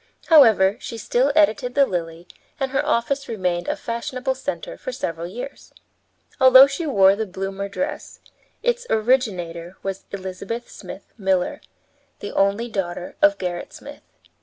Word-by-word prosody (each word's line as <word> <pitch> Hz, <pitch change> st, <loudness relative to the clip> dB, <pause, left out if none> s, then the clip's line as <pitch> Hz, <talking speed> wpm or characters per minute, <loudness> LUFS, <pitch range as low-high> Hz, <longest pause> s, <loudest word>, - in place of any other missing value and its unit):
However, 220 Hz, -, +6 dB
she 230 Hz, -, -7 dB
still 250 Hz, +5 st, +1 dB
edited 270 Hz, -5 st, +2 dB
the 280 Hz, -1 st, +5 dB
Lily, 170 Hz, -4 st, -5 dB, 0.3 s
and 270 Hz, -1 st, -1 dB
her 270 Hz, -, +1 dB
office 275 Hz, +4 st, 0 dB
remained 180 Hz, -5 st, -2 dB
a -, -, 0 dB
fashionable 255 Hz, +3 st, -3 dB
center 285 Hz, -, -5 dB
for -, -, -6 dB
several 165 Hz, -, -4 dB
years. 245 Hz, +9 st, -9 dB, 0.7 s
Although 260 Hz, 0 st, +9 dB
she 280 Hz, +4 st, -4 dB
wore 195 Hz, -7 st, +5 dB
the 220 Hz, +1 st, -3 dB
bloomer 195 Hz, +1 st, -5 dB
dress, 285 Hz, +9 st, -5 dB, 0.4 s
its 485 Hz, 0 st, 0 dB
originator 190 Hz, -8 st, 0 dB
was 195 Hz, 0 st, -5 dB
Elizabeth 200 Hz, +5 st, -6 dB
Smith 195 Hz, 0 st, -11 dB
Miller, 190 Hz, -2 st, 0 dB, 0.6 s
the -, -, -7 dB
only 200 Hz, +4 st, +1 dB
daughter 180 Hz, -5 st, -4 dB
of 300 Hz, 0 st, +5 dB
Gerrit 175 Hz, -2 st, -5 dB
Smith. -, -, -11 dB
220 Hz, 140 wpm, -22 LUFS, 190-270 Hz, 0.7 s, Although